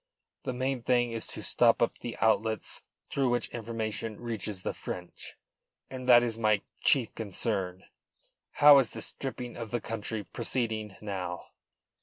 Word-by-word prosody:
The 130 - -1
main 130 0 -1
thing 120 0 +2
is 115 -1 -4
to - - -4
stop 115 -2 +4
up 120 - +1
the 120 - -6
outlets 110 -1 +1 0.3
through 135 -2 +2
which 120 -1 0
information 110 -1 -4
reaches 110 -5 -4
the - - -1
French, 90 -1 -7 0.6
and 130 -1 -5
that 120 -1 +9
is 115 -2 -1
my 110 -2 +3 0.2
chief 125 -6 +3
concern. 95 -3 -2 0.7
How 145 -1 +9
is 125 -5 0
the - - -4
stripping 125 -2 -5
of 115 -2 -6
the 120 - -1
country 110 -1 -4
proceeding 110 -3 -2
now?" 95 -4 -4
115 Hz, 150 wpm, -30 LUFS, 105-120 Hz, 0.7 s, that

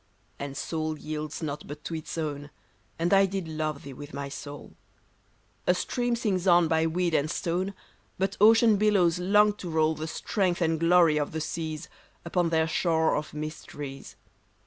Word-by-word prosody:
And 140 -1 -5
soul 155 -1 -2
yields 155 +1 -5
not 145 -1 -4
but 145 +1 -8
to - - -5
its 160 +1 -5
own; 145 -2 -3 0.5
And 170 +3 +1
I 195 0 +6
did 190 -3 -4
love 155 -2 -3
thee 140 - -8
wdth 145 +2 -9
my 140 0 -4
soul; 145 0 -9 0.9
A 180 - +5
stream 245 +5 -1
sings 200 -6 -1
on 175 -2 +6
by 160 0 +2
weed 175 +1 0
and 155 0 +2
stone, 180 +4 -2 0.4
But 195 +1 -1
ocean 225 0 +6
billows 190 -5 +3
long 210 +3 +4
to 180 - -6
roll 160 -1 +2
The 155 +1 -5
strength 180 +2 -1
and 165 -2 +1
glory 165 -2 +5
of 150 0 -2
the 160 - -2
.seas, 160 0 -4 0.4
Upon 170 0 +1
their 160 -1 +2
shore 160 -1 +2
of 150 0 -4
mysteries. 150 -2 -7
160 Hz, 170 wpm, -27 LUFS, 155-180 Hz, 0.9 s, I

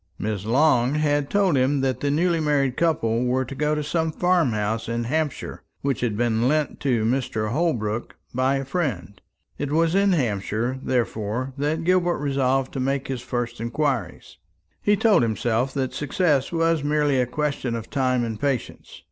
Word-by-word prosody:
Miss 105 -1 -3
Long 130 0 +3
had 145 -2 +1
told 195 -6 +2
him 135 +2 +2
that 130 -2 0
the 145 - -1
newly 165 +3 +2
married 140 -4 +1
couple 125 -9 +1
were 130 +1 +1
to 125 - -7
go 150 +2 0
to 150 - -2
some 160 +2 -1
farm 175 -3 +2
house 110 +2 -2
in 115 0 -1
Hampshire 150 +4 -2 0.2
which 135 -4 -1
had 115 -4 -1
been 115 0 +1
lent 150 +1 0
to 120 -6 +1
Mr. 115 -3 -1
Holbrook 120 -8 -1 0.2
by 130 +2 +2
a 135 0 -2
friend. 125 - -3 0.4
It 145 -1 -2
was 165 +2 +2
in 200 0 +3
Hampshire, 120 - -1
therefore, 120 0 -2
that 155 +3 -1
Gilbert 175 0 +2
resolved 135 -2 0
to - - -3
make 135 +1 -1
his 130 -2 -3
first 120 -2 -4
inquiries. 125 - -2 0.4
He 205 - +3
told 215 - +4
himself 115 +2 0
that 130 -2 -1
success 145 -1 0
was 165 -2 +1
merely 145 -2 +2
a 125 - 0
question 140 -3 -2
of 115 -1 -7
time 130 -3 +1
and 110 -2 -4
patience. 135 -3 -3
135 Hz, 175 wpm, -24 LUFS, 120-150 Hz, 0.4 s, told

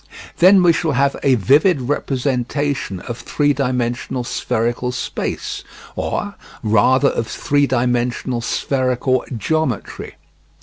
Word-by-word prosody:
Then 185 +1 +7
we 170 -1 +5
shall 160 -2 0
have 140 +2 +2
a 135 -2 +4
vivid 140 - +3
representation 130 -4 -2
of 120 -1 -6
three 145 -1 +1
dimensional 125 -2 -2
spherical 120 +1 -1
space, 125 - -4 0.3
or, - - -3 0.3
rather 125 +6 +4
of 115 - -2
three 145 +2 +1
dimensional 125 -1 0
spherical 130 0 0
geometry. 155 - -2
130 Hz, 105 wpm, -19 LUFS, 120-145 Hz, 0.3 s, Then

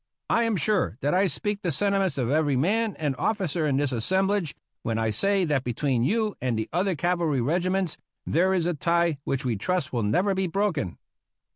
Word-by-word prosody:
I 235 - +3
am 225 -2 +1
sure 180 - +1
that 145 +4 +1
I 190 +2 +3
speak 205 +6 -2
the 175 - -1
senti 200 +7 +1
ments 190 -7 0
of 125 -1 0
every 150 -2 +2
man 210 - +1
and 145 -4 -1
officer 175 -7 0
in 135 -2 +1
this 145 -1 0
assemblage 190 - 0 0.3
when 115 -1 -2
I 110 -1 0
say 195 - +2
that 145 -5 0
between 125 0 0
you 215 - 0
and 125 -3 0
the 110 - -2
other 185 +2 +1
cavalry 170 -4 0
regiments 180 +6 0 0.3
there 185 +4 +2
is 180 -3 +1
a 175 - +1
tie 170 -1 +1
which 135 0 -2
we 120 -4 0
trust 180 - -2
will 120 - 0
never 180 - +1
be 190 0 0
broken. 175 - -1
170 Hz, 200 wpm, -26 LUFS, 135-195 Hz, 0.3 s, I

